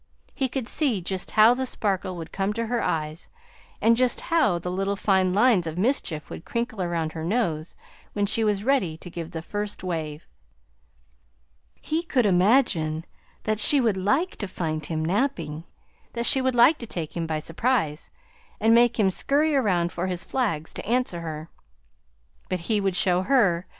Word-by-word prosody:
He 265 -2 -1
could 255 -2 -3
see 260 -9 0
just 185 +1 -4
how 220 +2 +6
the 260 +1 -2
sparkle 190 -5 -2
would 165 -1 -8
come 195 +1 -1
to 230 +1 -2
her 240 +1 -1
eyes, 155 +1 -3 0.5
and 230 +1 +4
just 250 0 +1
how 265 - +3
the 180 +1 -4
little 195 +2 -1
fine 190 -2 +2
lines 205 -3 +3
of 160 +1 -5
mischief 185 - -1
would - - -9
crinkle 235 -3 -3
around 170 -3 -1
her 160 0 -6
nose 170 -5 -1 0.4
when 205 -1 0
she 225 +3 +1
was 205 -2 0
ready 220 -12 +1
to 175 +2 -11
give 170 -2 -6
that 165 -2 -6
first 205 +1 -5
wave. 160 -4 -4 1.5
He 315 +2 -2
could 265 -8 +1
imagine 180 - +2 0.4
that 215 -1 -1
she 285 +6 +7
would 225 -6 +2
like 270 - 0
to 205 - -4
find 155 -4 -3
him 155 0 -3
napping; 175 - -1 0.5
that 235 0 -2
she 265 - +4
would 260 -1 0
like 260 +6 +5
to 235 - -7
take 165 -7 -5
him 165 -1 -2
by 160 -1 -1
surprise, 165 - -1 0.5
and 225 +1 +4
make 240 0 +4
him 195 -3 +4
scurry 295 +9 +1
around 180 -9 +1
for 175 +2 -3
his 180 -2 -3
flags 185 - -2
to - - -7
answer 235 -7 0
her. 155 -1 -6 1.0
"But 185 -2 -2
he 210 +3 0
would 195 -2 0
show 180 0 +2
her! 190 -7 +2
195 Hz, 180 wpm, -25 LUFS, 170-235 Hz, 1.5 s, she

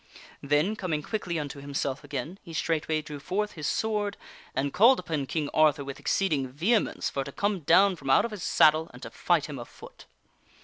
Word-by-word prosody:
Then, 150 +9 +1
coming 165 -7 -2
quickly 180 -5 -3
unto 145 -2 -5
himself 140 0 -3
again, 145 +6 -5
he 170 - -11
straightway 160 -1 -1
drew 150 -1 -8
forth 210 +7 -2
his 155 -3 -5
sword 210 -2 -1 0.4
and 135 +1 -1
called 235 +8 +6
upon 155 -6 -3
King 155 -1 -2
Arthur 150 -3 +3
with 140 -1 -7
ex - - -2
ceeding 150 -9 +1
vehemence 180 - 0
for 135 - -2
to 140 - -8
come 200 +5 -1
down 185 +5 +4
from 135 - -7
out 135 - +5
of 235 - -5
his 210 -3 -7
saddle, 155 +1 +4
and 125 - -12
to - - -7
fight 170 -4 +1
him 145 -4 -7
afoot. 120 - -12
155 Hz, 195 wpm, -27 LUFS, 140-190 Hz, 0.4 s, called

